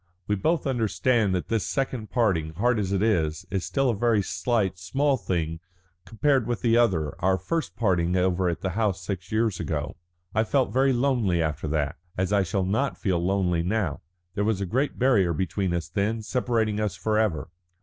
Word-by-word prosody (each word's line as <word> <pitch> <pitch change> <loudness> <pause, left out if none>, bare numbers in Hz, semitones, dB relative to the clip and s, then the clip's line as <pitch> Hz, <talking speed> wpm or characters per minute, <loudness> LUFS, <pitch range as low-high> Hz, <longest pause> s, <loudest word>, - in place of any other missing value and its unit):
We 105 - 0
both 160 - 0
understand 115 -4 +1
that 90 - -3
this 115 -4 +1
second 130 -5 -2
parting, 90 -11 0
hard 120 +4 +2
as 95 -2 -1
it 100 0 +1
is, 85 -6 +1
is 95 -3 -1
still 135 -3 +1
a - - -2
very 110 -1 +2
slight, 95 0 -1
small 135 +11 +1
thing 85 -7 -2 0.5
compared 130 +1 +1
with 120 -5 -2
the 115 -1 +4
other, 90 -11 +2
our 95 0 +3
first 160 - -3
parting 90 -5 +1
over 90 0 +2
at 85 - -3
the 95 - -2
house 95 -3 -1
six 90 -2 -5
years 110 -3 +1
ago. 75 -2 -3 0.4
I 110 - +3
felt 130 +3 +1
very 135 +2 +3
lonely 120 -8 +1
after 80 -1 -1
that, 75 -1 -1 0.2
as 95 +2 0
I 100 - +4
shall 95 +1 -1
not 120 +9 0
feel 90 -5 0
lonely 90 -2 +1
now. 95 -3 -1 0.3
There 105 - -1
was 105 -2 +1
a 100 - -1
great 130 +9 -1
barrier 105 -10 +3
between 95 +3 -1
us 85 -1 -2
then 105 +5 -1
separating 115 -3 0
us 105 -3 -1
forever. 105 -5 0
100 Hz, 190 wpm, -26 LUFS, 90-115 Hz, 0.5 s, the